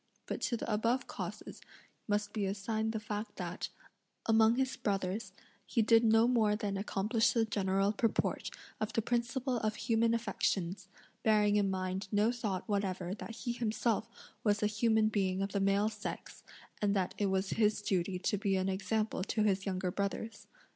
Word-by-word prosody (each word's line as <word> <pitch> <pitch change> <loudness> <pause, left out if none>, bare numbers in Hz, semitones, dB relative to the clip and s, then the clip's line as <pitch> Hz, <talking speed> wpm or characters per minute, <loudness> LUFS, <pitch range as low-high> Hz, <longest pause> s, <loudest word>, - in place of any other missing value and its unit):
But - - -4
to 235 - 0
the 230 - -2
above 230 +5 +1
causes - - -7 0.5
must 205 0 0
be 205 -3 0
assigned 220 +3 -1
the 220 - -2
fact 210 0 -5
that, 175 -1 -4 0.6
among 225 0 +5
his 260 0 0
brothers, 195 +1 -2 0.3
he 230 - +1
did 225 +1 +5
no 225 +1 +5
more 220 -4 +3
than 205 -2 -2
accomplish 210 +3 +1
the 230 -2 +3
general 195 -1 +1
purport 225 +1 0 0.3
of 215 - -2
the 225 - +2
principle 245 +2 0
of 215 -2 -1
human 230 +1 +2
affections; 195 -4 -1 0.3
bearing 210 -1 +4
in 205 -1 +3
mind 185 +1 -2
no 210 +3 +3
thought 215 -6 -3
whatever 190 -3 -1
that 225 +2 -7
he 240 - +1
himself 230 -1 0 0.3
was 210 0 +2
a - - +4
human 220 +1 +3
being 190 -3 0
of 195 - -3
the 200 - 0
male 195 +2 +3
sex, - - -7 0.4
and 205 -1 +2
that 185 -2 0
it 205 - +2
was 190 0 0
his 210 -2 +2
duty 185 -1 0
to 190 +2 -1
be 195 -1 +1
an 190 0 +1
example 195 +1 -1
to 215 - 0
his 195 -1 +1
younger 185 -1 -1
brothers. 200 +4 -3
210 Hz, 175 wpm, -33 LUFS, 195-225 Hz, 0.6 s, among